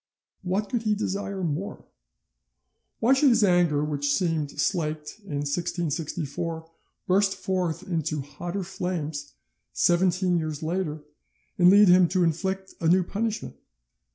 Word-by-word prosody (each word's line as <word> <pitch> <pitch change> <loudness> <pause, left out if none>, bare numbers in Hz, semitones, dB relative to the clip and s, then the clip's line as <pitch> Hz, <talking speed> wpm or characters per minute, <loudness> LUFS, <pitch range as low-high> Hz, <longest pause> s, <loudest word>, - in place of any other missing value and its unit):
What 195 +3 -1
could 240 +2 -1
he 215 -2 +1
desire 200 -2 -3
more? 170 +6 -3 1.2
Why 240 +4 +5
should 270 +1 +5
his 230 -3 +4
anger, 175 -6 +3
which 145 -1 -1
seemed 160 -3 0
slaked 155 -1 -2
in 200 -8 -7
1664, 165 +1 -3 0.4
burst 195 +1 +2
forth 185 -1 -2
into 160 -4 -1
hotter 175 +7 -5
flames 170 -6 -4 0.4
seventeen 180 0 +2
years 155 -1 -4
later, 160 -2 -2 0.6
and 175 0 +7
lead 205 +2 +7
him 180 0 +6
to 180 +1 +1
inflict 190 +4 -1
a 165 - +1
new 180 +2 +4
punishment? 215 +4 -3
175 Hz, 125 wpm, -26 LUFS, 155-190 Hz, 1.2 s, and